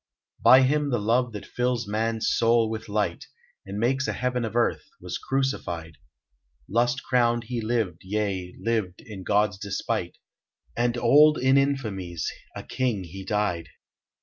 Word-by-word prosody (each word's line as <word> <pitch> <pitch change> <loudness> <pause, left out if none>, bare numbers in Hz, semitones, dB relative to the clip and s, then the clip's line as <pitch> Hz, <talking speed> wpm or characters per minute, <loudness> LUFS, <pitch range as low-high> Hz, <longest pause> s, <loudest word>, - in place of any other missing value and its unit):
By 130 +1 +8
him 145 +2 +1
the 120 - +1
love 115 +4 +1
that 105 - -7
fills 125 -2 -1
man's 110 +1 -1
soul 115 -1 +3
with 110 -1 -6
light, 100 -5 -1 0.4
And 100 +1 -5
makes 130 +5 +1
a - - -1
Heaven 125 -1 -1
of 110 - -6
Earth, 120 - 0
was - - -5
crucified; 85 - -2 0.7
Lust 120 +5 +1
crowned 120 -2 +2
he 120 0 -4
lived, 110 -7 -1
yea, 95 -2 -2
lived 110 -6 -2
in 100 -4 -9
God's 105 0 +1
despite, 100 -2 -3 0.6
And 120 0 0
old 150 +6 +6
in 130 +1 +3
infamies, 110 - -1 0.3
a - - -6
king 120 -7 -1
he 95 +3 -9
died. 95 -5 -1
115 Hz, 150 wpm, -26 LUFS, 100-125 Hz, 0.7 s, By